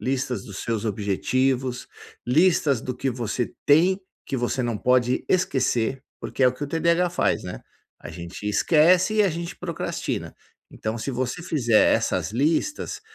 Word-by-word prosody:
listas 130 -5 -2
dos 100 -2 -8
seus 115 -1 -2
objetivos, 125 +5 -1 0.4
listas 145 -2 +3
do 125 - -4
que 130 +2 -2
você 120 0 -3
tem, 175 +7 +4 0.3
que 135 - -2
você 125 +1 -1
não 120 -2 -1
pode 125 +2 +2
esquecer, 130 -7 +1 0.2
porque - - -3
é 130 - +7
o 125 - -1
que 145 - -5
o - - -5
TDH 170 +3 +2
faz, 175 - 0
né, 90 - -7 0.4
a - - -9
gente 85 +4 -9
esquece 175 - +4
e 215 - +4
a 200 - +3
gente 170 +2 -5
procrastina. 170 -3 -4 0.4
Então, 110 +2 -4
se 125 - -3
você 125 +5 -3
fizer 120 -10 +3
essas - - -1
listas, 160 - 0
130 Hz, 160 wpm, -24 LUFS, 120-165 Hz, 0.4 s, é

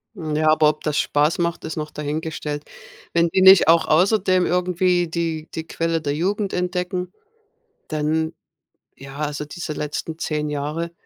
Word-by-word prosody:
Ja, 155 -3 0
aber 155 -1 +4
ob 155 - -4
das 150 -2 -1
spaß 150 +3 +1
macht, 170 0 -1
ist 160 - -5
noch 150 -1 -4
dahingestellt. 150 0 -4 0.5
Wenn 170 0 +3
die 190 - +1
nicht 190 -2 +8
auch 165 0 +5
außerdem 185 +2 +3
irgendwie 180 0 +1
die 165 -1 -3
die 160 - -4
Quelle 165 0 -1
der 145 -2 -1
Jugend 195 +6 -1
entdecken, 180 0 -2 0.8
dann 155 +1 -1 0.6
ja, 135 0 -11
also 150 -1 -3
diese 155 +1 -6
letzten 150 +2 -4
10 150 -2 -2
Jahre, 150 +3 -3
160 Hz, 150 wpm, -22 LUFS, 150-180 Hz, 0.8 s, nicht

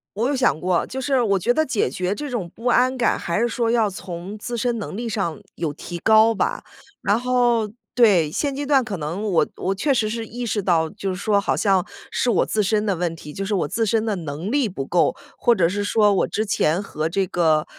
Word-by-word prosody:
我 215 - -1
我 250 - +2
有 285 - 0
想 250 -11 +2
过， 180 0 +1
就 265 - -5
是 265 -1 +1
我 200 -4 +2
觉 235 +7 +2
得 315 +4 +2
解 235 - 0
决 180 +8 -2
这 295 +3 -5
种 220 -9 -3
不 230 - -12
安 255 +1 +3
感， 240 - +2
还 170 +5 -1
是 235 - +2
说 235 0 -1
要 225 -3 +2
从 185 +1 -7
自 240 +3 -5
身 240 0 0
能 205 - -5
力 235 +1 -3
上 195 -7 -2 0.2
有 160 -3 -3
提 175 - -7
高 220 +4 +5
吧， - - -1 0.4
然 205 +3 +2
后 240 -3 +2 0.3
对。 195 -11 +4
现 280 - -1
阶 290 +1 -3
段 275 -2 +3
可 205 -5 -4
能 165 +6 -4
我 195 -6 +2
我 190 +1 -1
确 275 +9 +1
实 220 -4 +1
是 225 +1 -4
意 240 +3 -6
识 215 -2 -1
到， 165 -3 +2
就 195 - -5
是 185 - -2
说 205 +2 +1
好 - - 0
像 195 -4 +2 0.3
是 250 - 0
我 235 - +3
自 215 - 0
身 210 +1 +1
的 200 -3 +1
问 170 -1 -2
题， 150 -2 -10
就 195 - -4
是 210 - -2
我 175 - 0
自 225 +8 0
身 220 +1 +1
的 215 -2 0
能 160 +4 -5
力 270 -4 +1
不 140 -8 -5
够， 175 +4 +2 0.2
或 240 - +4
者 180 -5 +3
是 205 +2 -2
说 210 0 +3
我 195 - +1
之 215 - -2
前 180 -3 +1
和 155 -4 -3
这 195 +3 0
个， 160 -3 +2
210 Hz, 265 characters per minute, -22 LUFS, 180-235 Hz, 0.4 s, 高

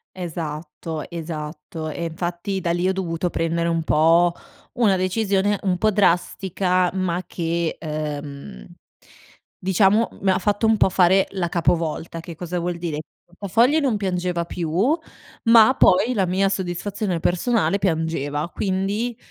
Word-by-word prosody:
Esatto, 160 -2 -6
esatto, 155 -1 -6
e 170 - -5
infatti 175 +3 -3
da 170 -1 -1
lì 175 +1 -1
ho 190 - +3
dovuto 180 -2 -2
prendere 170 +1 -1
un 165 -1 0
po' 165 +3 +4 0.4
una 210 -6 +3
decisione, 195 +1 +1
un 185 -2 +1
po' 215 +3 +2
drastica, 185 -1 +1
ma 185 -1 -1
che, 170 -1 -2
uhm, 145 - -6 0.9
diciamo 195 +4 +3
mi 190 -1 +3
ha - - +2
fatto 205 +2 0
un 220 - +4
po' 200 - +3
fare 190 +1 +4
la 185 -3 -1
capovolta, 165 -1 -1
che 165 0 -9
cosa 175 +1 -4
vuol 175 +1 -2
dire, 165 -3 -3 0.3
portafogli 225 - +1
non 265 -7 +1
piangeva 180 -3 -1
più, 170 -1 -4 0.7
ma 230 +1 +6
poi 230 +5 +4
la 195 -4 +1
mia 190 +2 +1
soddisfazione 190 0 -3
personale 200 +2 +1
piangeva, 160 -3 -1
quindi 205 +5 -2
180 Hz, 135 wpm, -22 LUFS, 165-195 Hz, 0.9 s, ma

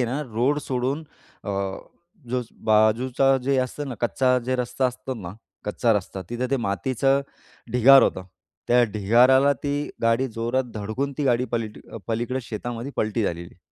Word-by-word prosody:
आहे 125 - +3
ना, 135 +5 -2
रोड 130 +6 +1
सोडून 130 +4 -2 0.4
अ, - - -6 0.8
जो 125 0 -1 0.3
बाजूचा 125 +5 +3
जे 135 +1 +1
असतं 135 +3 -2
ना, 125 - -4
कच्चा 125 +2 +2
जे 130 +1 0
रस्ता 125 +1 0
असतो 130 +1 -5
ना. 90 -6 -7 0.3
कच्चा 115 +2 +1
रस्ता, 95 -2 -3
तिथं 120 +2 -2
ते 135 - +2
मातीचं 130 +6 +1 0.5
ढिगार 135 +3 +7
होतं. 95 - 0 0.4
त्या 120 0 +5
ढिगाराला 125 +7 +5
ती 145 -1 -1 0.3
गाडी 115 +3 +2
जोरात 120 +3 -1
धडकून 110 +7 -3
ती 145 - 0
गाडी 125 -1 +2
पलटी 110 -2 -3 0.3
पलीकडे 120 +3 -1
शेतामध्ये 120 +3 -5
पलटी 110 +1 0
झालेली. 85 -1 -4
125 Hz, 155 wpm, -24 LUFS, 110-130 Hz, 0.8 s, ढिगार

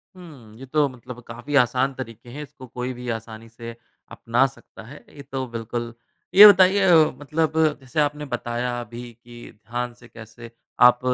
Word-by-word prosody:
हुँ। 145 -12 -14
ये 135 - -9
तो 145 +2 +1
मतलब 125 -1 -11
काफ़ी 120 +5 -6
आसान 130 +3 0
तरीके 120 -2 -9
हैं 150 +4 -7
इसको 130 -2 -13
कोई 125 +1 -5
भी 125 0 -9
आसानी 115 0 -7
से 115 0 -10 0.4
अपना 120 +3 +1
सकता 135 - -15
है। 140 +6 -13
ये 145 - -10
तो 130 -1 -3
बिल्कुल 115 +1 -5 0.4
ये 210 +2 +12
बताइए 195 0 +5
अ, - - +6 0.3
मतलब 155 +2 -1 0.3
जैसे 135 +4 -4
आपने 150 0 -2
बताया 120 +1 -3
अभी 120 +1 -9
कि 120 0 -13
ध्यान 120 +3 -6
से 120 0 -18
कैसे 115 0 -13 0.4
आप 125 0 +3
125 Hz, 170 wpm, -23 LUFS, 115-140 Hz, 0.4 s, ये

